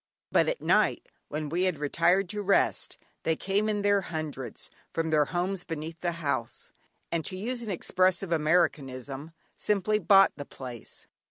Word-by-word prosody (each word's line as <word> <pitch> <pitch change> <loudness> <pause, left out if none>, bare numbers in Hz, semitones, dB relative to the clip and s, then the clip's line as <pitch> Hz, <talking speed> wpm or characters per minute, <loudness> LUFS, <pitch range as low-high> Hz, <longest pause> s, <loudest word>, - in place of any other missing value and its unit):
But - - +4
at - - -2
night - - +3 0.2
when 150 0 -3
we 175 +5 0
had 180 -4 0
retired 170 +6 +2
to 210 +1 -2
rest, 200 0 +1 0.2
they 160 - +1
came 200 +5 0
in 205 -1 -1
their 205 -1 +3
hundreds, 155 - -6 0.2
from 165 -1 -1
their 150 -1 +4
homes 180 +4 -2
beneath 160 0 -6
the 175 -1 0
house, 160 -4 -3 0.4
and 170 -1 0
to 185 - -3
use 240 +5 -2
an 225 - -6
expressive 185 0 +1
Americanism 150 -3 0 0.3
"simply 210 +1 +1
bought 195 +1 +6
the 145 - -6
place." 125 -5 -10
170 Hz, 160 wpm, -28 LUFS, 155-195 Hz, 0.4 s, bought